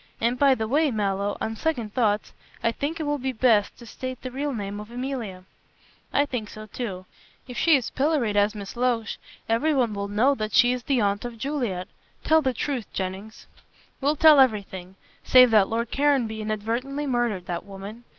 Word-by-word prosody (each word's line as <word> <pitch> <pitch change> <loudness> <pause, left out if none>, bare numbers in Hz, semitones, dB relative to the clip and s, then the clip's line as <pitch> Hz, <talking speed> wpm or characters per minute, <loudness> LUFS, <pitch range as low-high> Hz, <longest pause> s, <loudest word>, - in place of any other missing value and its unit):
And, 240 +2 0
by 275 -2 +5
the 220 -2 -3
way, 295 +5 +2
Mallow, 200 -3 -1
on 225 - -3
second 235 -7 -2
thoughts, 210 -4 0 0.3
I 230 - +3
think 295 +7 -4
it - - -2
will 290 -1 -1
be 260 +1 -2
best 220 -4 +2
to 240 - -12
state 255 +3 -6
the 255 - -5
real 285 +3 -2
name 205 -4 -4
of 210 +1 -9
Emilia." 240 -7 -5 0.7
"I 285 - +3
think 235 -7 -4
so 215 0 -9
too. 200 -5 -6 0.4
If 250 - -8
she 325 +5 +4
is 260 -4 -1
pilloried 270 -7 0
as 205 +1 +2
Miss 200 +1 -7
Loach, 240 -2 -1 0.3
everyone 245 -1 +1
will 200 0 -3
know 225 +8 +3
that 215 -5 -4
she 245 -1 +5
is 250 0 -2
the 255 -1 +1
aunt 200 0 0
of 240 -1 -6
Juliet. 230 -9 -3 0.4
Tell 320 0 +4
the 265 -3 +1
truth, 250 -1 -3
Jennings." 190 +3 -5 0.6
"We'll 285 +3 +2
tell 310 -1 +7
everything, 195 -7 +1 0.3
save 255 -2 +7
that 210 -3 +5
Lord 230 +1 -2
Caranby 265 -7 +1
inadvertently 230 +7 -3
murdered 240 -8 -1
that 175 -2 -4
woman. 200 +4 -9
235 Hz, 190 wpm, -25 LUFS, 210-265 Hz, 0.7 s, tell